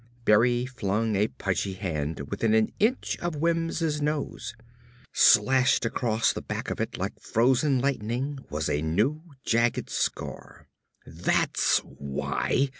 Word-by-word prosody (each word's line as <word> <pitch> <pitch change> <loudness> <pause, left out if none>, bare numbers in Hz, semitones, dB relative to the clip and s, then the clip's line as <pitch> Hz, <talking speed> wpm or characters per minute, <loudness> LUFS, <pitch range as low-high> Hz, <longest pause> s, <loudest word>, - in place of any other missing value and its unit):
Berry 120 +3 +4
flung 110 -3 -1
a 105 +2 +2
pudgy 95 -1 -2
hand 80 -6 -3
within 110 -1 +1
an 110 -1 +2
inch 230 +5 0
of 175 -2 -2
Wims' 165 -1 0
nose. 150 -5 -3 0.6
Slashed 125 +3 +4
across 115 -1 +1
the - - -5
back - - -4
of - - -3
it, - - -3
like - - -4
frozen 130 +4 +2
lightning, 130 +1 -2
was 75 0 -2
a 75 - 0
new, 105 - 0 0.2
jagged 115 +1 +1
scar. - - -4 0.4
"That's 80 +3 +1
why!" 70 - -2
115 Hz, 125 wpm, -27 LUFS, 100-140 Hz, 0.6 s, Berry